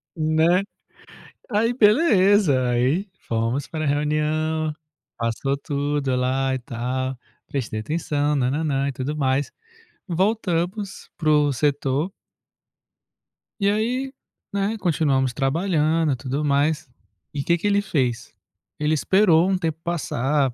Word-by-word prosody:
Né? 160 +3 +3 0.9
Aí 225 +3 +2
beleza, 205 - +4
aí 130 - +1 0.2
fomos 115 +4 -1
para 155 -1 -3
a - - 0
reunião, 155 +2 0 0.4
passou 115 +4 -1
tudo 140 -1 -1
lá 130 +1 0
e 130 - -2
tal, 130 +2 -3 0.3
prestei 115 -6 -3
atenção, 150 +3 -1
nã-nã-nã, 140 +1 0
e - - -2
tudo 135 +3 -4
mais, 135 -1 0 0.6
voltamos 190 +1 -1
para 155 -2 -1
o 150 -2 +4
setor 145 +5 0 1.5
e 200 -1 +3
aí, 245 +6 -1 0.4
né, 200 +2 0
continuamos 140 -8 +1
trabalhando 155 +3 +1
e - - -1
tudo 135 +3 -3
mais, 145 +1 +1 0.4
e 140 -1 -2
que 170 +3 +2
que 190 - -2
ele 205 0 +3
fez? 130 - -1 0.5
Ele 150 +1 +1
esperou 175 +1 +4
um 190 - +2
tempo 160 -3 -2
passar, 145 -5 0
150 Hz, 120 wpm, -23 LUFS, 135-175 Hz, 1.5 s, beleza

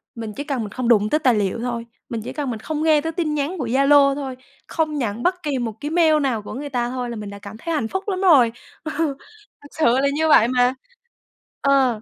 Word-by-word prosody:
mình 225 -2 -6
chỉ 285 - -5
cần 275 -4 -2
mình 210 - -5
không 255 +2 -3
đụng 215 -3 +4
tới 305 - +2
tài 255 -6 +3
liệu 205 +1 -1
thôi, 235 -1 -3 0.2
mình 230 -2 -4
chỉ - - -7
cần 290 -3 -3
mình 225 - -5
không 310 +6 -3
nghe 310 -2 +4
tới 325 +2 -3
tin 325 -2 -2
nhắn 295 +6 -2
của 255 - -2
Zalo 275 +2 +4
thôi, 270 -3 -5 0.3
không 310 -2 -1
nhận 235 -3 -3
bất 360 0 0
kỳ 290 -3 -1
một 230 -3 -3
cái 295 - -4
mail 320 -2 +4
nào 250 -6 0
của 205 - -8
người 285 +2 -5
ta 240 -2 -1
thôi, 250 -1 -4
là 235 - -5
mình 210 -2 -6
đã 200 0 -9
cảm 200 +2 -10
thấy 335 +8 -4
hạnh 230 -8 -1
phúc 380 - -3
lắm 380 -2 -2
rồi, 285 -11 +5 0.3
ừ, 310 - -4 0.7
thật 285 - -13
sự 320 - -1
là 275 - +2
như 315 +1 +1
vậy 230 -6 +6
mà, 250 0 +2 0.9
ờ. 265 -5 +2
270 Hz, 255 wpm, -21 LUFS, 235-305 Hz, 0.9 s, vậy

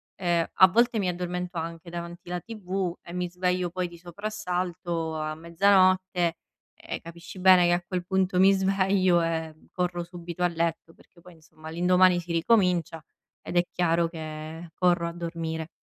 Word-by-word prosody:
ehm, 175 -3 +1
a 185 +2 +8
volte 235 +2 +2
mi 185 -2 0
addormento 180 0 -4
anche 165 +1 -5
davanti 175 0 -8
la 180 0 -2
tv 190 -4 -4
e 170 - -11
mi 180 -1 -2
sveglio 180 0 -1
poi 180 -1 -2
di 170 - -13
soprassalto 175 -3 -4
a 155 0 -3
mezzanotte. 185 0 +2 0.5
Eh, - - -6
capisci 170 +2 -11
bene 185 -1 +7
che 175 - +3
a 175 0 0
quel 180 -1 -3
punto 190 -1 +1
mi 195 +1 +7
sveglio 190 -2 +2
e 160 -1 -2 0.2
corro 180 -1 -1
subito 175 0 -6
a - - +5
letto 165 -1 -2
perché 170 - -23
poi, 180 +1 -15
insomma, 155 0 -15
l'indomani 180 +1 +4
si 170 0 -8
ricomincia 170 -3 +2 0.4
ed 175 - -4
è 175 - +5
chiaro 170 -1 +1
che 160 0 -8
corro 175 -2 +2
a - - -4
dormire. 165 -1 -4
175 Hz, 165 wpm, -26 LUFS, 170-185 Hz, 0.5 s, a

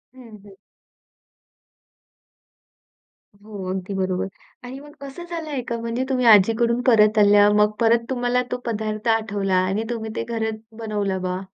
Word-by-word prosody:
हं, 230 -4 -13
हं. 200 - -14 2.9
हो, 210 -2 -8
अगदी 190 +1 -4
बरोबर 185 -1 -1 0.4
आणि 255 +2 -8
मग 295 0 -14
असं 275 +6 -9
झालंय 310 -6 -4
का 235 - -2
म्हणजे 230 +2 -2
तुम्ही 255 -2 0
आजीकडून 230 +3 +4
परत 215 -2 +5
आल्या. 205 0 +6
मग 210 0 +3
परत 230 0 +3
तुम्हाला 245 -1 0
तो 250 - -1
पदार्थ 215 -1 -3
आठवला 200 -4 -2
आणि 200 +4 -1
तुम्ही 225 -2 -4
ते - - -2
घरात 220 -2 -3 0.2
बनवलं 205 -4 -2
बा? 185 0 -3
220 Hz, 140 wpm, -22 LUFS, 205-245 Hz, 2.9 s, आल्या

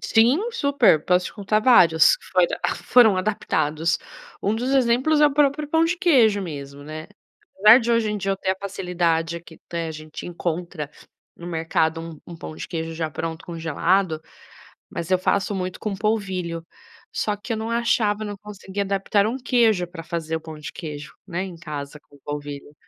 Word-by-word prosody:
Sim, 235 +6 +4
super, 280 - +3
posso 180 0 +2
te - - -8
contar 210 +1 0
vários, 185 - +6
que - - -21
foi - - +3
adap - - -2
foram 225 -6 +6
adaptados. 165 -5 0 0.4
Um 205 - +1
dos 245 +4 -2
exemplos 265 +3 +3
é 300 - +8
o 290 - +1
próprio 295 +1 +2
pão 320 +2 +3
de 340 +2 0
queijo 255 - +4
mesmo, 145 -5 -7
né. 155 +1 -7 0.5
Apesar 215 +5 +8
de 235 0 -1
hoje 230 -2 +2
em 210 - -1
dia 195 -1 -2
eu - - -2
ter 190 - -1
a - - -7
facilidade, 175 -4 -1
aqui 165 -1 -12
até 170 -1 -3
a - - -4
gente 155 0 -8
encontra 170 -3 -4 0.5
no 170 - -10
mercado 160 -1 0
um 165 -2 -9
um - - -8
pão 160 - -8
de - - -7
queijo 165 -2 -4
já 160 -1 -2
pronto 160 +2 -5
congelado, 165 +1 0 0.7
mas 170 +1 -5
eu 185 - +4
faço 200 +2 0
muito 185 -1 -3
com 215 -3 -3
polvilho, 190 -5 -2 0.5
só 210 -1 -1
que 210 +4 -6
eu 225 - -1
não 220 +1 -4
achava, 225 -2 +1
não 205 -1 -5
conseguia 200 -1 -6
adaptar 200 +1 +1
um 230 +4 -1
queijo 230 -8 +2
pra 175 -1 -9
fazer 165 -1 -4
o - - -5
pão 160 -1 -9
de 150 - -7
queijo, 150 -2 -7
né, 175 -1 -3
em 185 -3 -8
casa 150 -3 -7
com 145 - -21
o - - -25
polvilho. 145 0 -6
185 Hz, 195 wpm, -23 LUFS, 160-220 Hz, 0.7 s, é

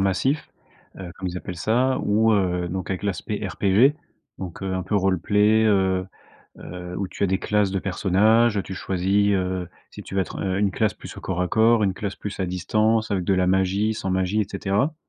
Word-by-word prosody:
massif, 100 +10 0 0.5
heu, 90 -2 -7
comme 95 -1 -4
ils 90 - -6
appellent 90 - -7
ça, 125 - +1
ou, 110 +2 +3
heu, 90 -3 +1
donc 95 +1 -4
avec 95 +1 -3
l'aspect 100 +1 -3
RPG, 100 +9 +3 0.4
donc, 90 -3 -7
heu, 95 -1 -2
un 95 - -2
peu 105 +4 -1
roleplay, 105 +4 +3
heu 95 -3 +2 0.5
heu, 90 0 -8
où 100 -2 -3
tu - - -2
as - - +3
des 95 0 0
classes 105 -1 +1
de 95 - 0
personnages. 105 +4 +2
Tu 95 - -6
choisis, 95 +3 +1
heu, 90 -2 -2 0.2
si - - -10
tu - - -9
veux 95 - +2
être, - - -4
heu, 95 0 -1
une 100 -1 +2
classe 105 0 0
plus - - -11
au - - -8
corps 90 -1 -3
à 90 - 0
corps, 115 0 +4
une 95 -2 +1
classe 100 0 -4
plus 105 - -6
à 95 - -1
distance, 110 +5 0
avec 95 -3 0
de 95 - +2
la 90 0 +2
magie, 95 +3 +1
sans 95 -3 -3
magie, 95 +3 +1
et 100 - 0
cetera. 100 +9 -1
95 Hz, 215 wpm, -23 LUFS, 95-105 Hz, 0.5 s, corps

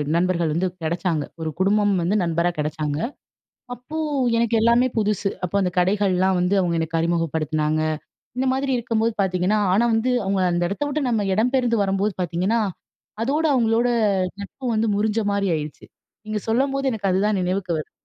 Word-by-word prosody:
நண்பர்கள் 170 -2 +1
வந்து 180 +3 0 0.2
கிடச்சாங்க. 165 -1 -1 0.2
ஒரு 160 - -2
குடும்பம் 205 +2 +3
வந்து 180 +5 0
நண்பரா 170 +1 +1
கெடச்சாங்க. 150 -1 -2 0.8
அப்போ 250 +6 -9 0.4
எனக்கு 230 0 +1
எல்லாமே 235 +2 +4
புதுசு, 210 -2 0 0.2
அப்போ 180 +3 -2
அந்த 180 - 0
கடைகள்லாம் 190 0 +2
வந்து 180 +3 +1
அவங்க 175 -2 0
எனக்கு 165 0 -1
அறிமுகப்படுத்தினாங்க. 155 -2 0 0.6
இந்த 260 - +1
மாரி 270 0 -1
இருக்கும்போது 230 -1 0
பாத்தீங்கன்னா, 185 +3 +1
ஆனா 215 +5 +3
வந்து 230 +3 +1
அவங்க 195 0 0
அந்த 175 0 0
இடத்த 200 +10 -2
விட்டு 285 -2 -1
நம்ம 220 -4 +1
இடம் 220 +6 +1
பெயர்ந்து 240 -4 +2
வரும்போது 195 +1 0
பாத்தீங்கன்னா, 180 +6 0 0.6
அதோட 295 +6 0
அவங்களோட 235 -1 +2 0.5
நட்பு 230 +7 -9
வந்து 220 +1 +1
முறிஞ்ச 215 +2 +1
மாரி 200 -1 0
ஆயிடுச்சு. 150 -1 -7 0.4
நீங்க 215 0 -2
சொல்லம்போது 270 +3 +1
எனக்கு 200 -3 -1
அதுதான் 200 +2 +1
நினைவுக்கு 185 0 -1
வருது. 155 - -6
200 Hz, 155 wpm, -22 LUFS, 175-230 Hz, 0.8 s, எல்லாமே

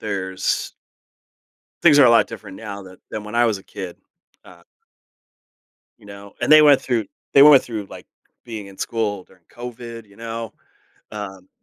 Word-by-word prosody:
there's 95 -3 -2 1.1
Things 150 -4 +6
are 140 - +8
a 120 - +6
lot 115 - +5
different 105 -4 -10
now 100 -3 -8
than 95 -1 -14
than 105 -1 -6
when 105 +2 -9
I 120 0 +4
was 105 -4 0
a - - -15
kid, 95 -4 -8 0.5
uh 85 -1 -17 1.4
You 105 - -18
know, 100 0 -12
and - - -1
they 155 0 +9
went 145 -2 +6
through 120 -4 -1 0.3
they 140 - +7
went 145 -2 +8
through, 110 -4 -6
like, - - -11 0.4
being 110 -4 -7
in 95 - -15
school 105 -5 -2
during 90 -2 -25
COVID, 120 -2 -9
you 100 0 -21
know, 115 -1 -6 0.6
um, 95 -3 -8
105 Hz, 170 wpm, -21 LUFS, 100-120 Hz, 1.4 s, they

